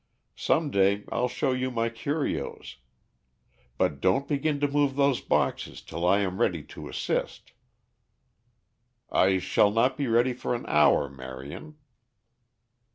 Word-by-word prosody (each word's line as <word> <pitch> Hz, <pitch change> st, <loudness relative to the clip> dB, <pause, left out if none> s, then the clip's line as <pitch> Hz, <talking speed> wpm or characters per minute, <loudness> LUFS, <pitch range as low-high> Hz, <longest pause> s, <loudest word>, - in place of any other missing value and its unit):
Some 155 Hz, -2 st, +1 dB
day 100 Hz, 0 st, +2 dB
I'll 125 Hz, -, +1 dB
show 135 Hz, +2 st, -1 dB
you 130 Hz, 0 st, -1 dB
my 115 Hz, -2 st, -1 dB
curios. 115 Hz, -, -4 dB, 1.0 s
But 70 Hz, -2 st, 0 dB
don't 95 Hz, +9 st, +2 dB
begin 145 Hz, 0 st, 0 dB
to 145 Hz, -, +3 dB
move 140 Hz, -1 st, +1 dB
those 140 Hz, -2 st, +2 dB
boxes -, -, -1 dB
till 85 Hz, +2 st, -3 dB
I 100 Hz, +2 st, +4 dB
am 95 Hz, -1 st, -2 dB
ready 85 Hz, -5 st, +1 dB
to -, -, -10 dB
assist." -, -, -3 dB, 1.6 s
"I 95 Hz, 0 st, +3 dB
shall 100 Hz, +2 st, +3 dB
not 115 Hz, +5 st, +1 dB
be 140 Hz, -, -1 dB
ready 120 Hz, +2 st, +3 dB
for 125 Hz, 0 st, -3 dB
an 120 Hz, -, -6 dB
hour, 75 Hz, -1 st, +4 dB
Marion." 65 Hz, -, -9 dB
115 Hz, 135 wpm, -27 LUFS, 90-140 Hz, 1.6 s, I